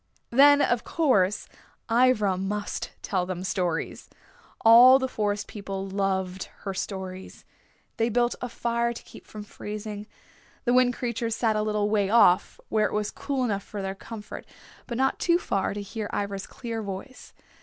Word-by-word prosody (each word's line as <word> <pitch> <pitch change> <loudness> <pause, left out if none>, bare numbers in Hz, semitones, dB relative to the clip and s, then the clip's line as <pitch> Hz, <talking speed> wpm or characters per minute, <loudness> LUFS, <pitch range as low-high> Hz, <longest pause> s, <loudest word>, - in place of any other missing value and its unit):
Then, 285 +3 +7
of 240 -3 +1
course, 210 - +1 0.4
Ivra 230 -5 +3
must 205 +2 -3
tell 185 -3 -1
them 185 -1 -4
stories. 180 -3 -2 0.5
All 240 +3 +9
the 260 -1 -1
Forest 205 -4 -2
People 195 -2 -6
loved 190 -1 -2 0.2
her 195 - -4
stories. 190 -1 -6 0.5
They 230 0 +1
built 240 +1 +2
a 250 - -3
fire 235 0 -1
to - - -10
keep - - -14
from 210 -1 -8
freezing. 210 0 -7 0.6
The 245 - +2
Wind 250 -1 +4
Creatures 235 -2 -2
sat 225 -3 +1
a 215 - +1
little 210 -1 0
way 205 -2 +1
off 205 -5 +4
where 215 -1 +2
it - - -8
was 210 0 -1
cool 275 -2 -2
enough 205 -5 -1
for 200 0 -7
their 190 0 -3
comfort, 210 +2 -9 0.4
but 235 - -4
not 265 +1 +1
too 340 -1 +3
far 195 - -1
to 205 - -4
hear 210 +1 -5
Ivra's 200 -1 -3
clear 230 -3 -5
voice. 200 +6 -8
210 Hz, 165 wpm, -26 LUFS, 195-240 Hz, 0.6 s, All